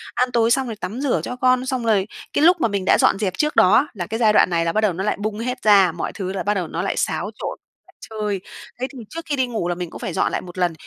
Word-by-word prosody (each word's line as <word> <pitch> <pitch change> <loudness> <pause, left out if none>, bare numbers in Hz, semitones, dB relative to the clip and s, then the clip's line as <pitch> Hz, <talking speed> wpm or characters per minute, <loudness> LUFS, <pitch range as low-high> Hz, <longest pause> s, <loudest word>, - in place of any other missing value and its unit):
ăn 250 0 +1
tối 230 -1 +2
xong 265 +1 +2
rồi 225 - -5
tắm 215 +4 -5
rửa 280 -3 +1
cho 250 - -4
con, 255 0 +2
xong 255 -2 -2
rồi 210 -3 +2 0.3
cái 295 - +2
lúc 350 0 +5
mà - - +3
mình 200 -3 -2
đã - - +5
dọn - - +3
dẹp 195 -4 -1
trước 300 0 0
đó 185 - +6
á 265 - +5
là 175 -5 -5
cái 225 +2 -4
giai 220 -3 +4
đoạn - - +5
này 170 -1 0
là 165 - 0
bắt 215 - +2
đầu 205 -5 +2
nó 190 +3 -4
lại 210 - 0
bung 210 +1 -3
hết 250 +2 -3
ra, 200 -4 +6
mọi 170 - -5
thứ 190 -1 -4
là 195 - -3
bắt 205 - +1
đầu 185 -4 -2
nó 165 +2 -4
lại 195 - -2
xáo - - -1
trộn - - -4 0.3
lại - - -22 0.2
chơi. 210 -3 -3 0.4
Thế 255 - -1
thì 260 - -9
trước 330 +1 -7
khi 300 -3 -1
đi 260 -2 0
ngủ 225 -7 -3
là 175 - -1
mình 175 -1 -5
cũng - - -10
phải 180 - -4
dọn - - +1
lại - - -2
một 180 0 -11
lần 180 -2 +1
215 Hz, 320 wpm, -21 LUFS, 185-250 Hz, 0.4 s, đó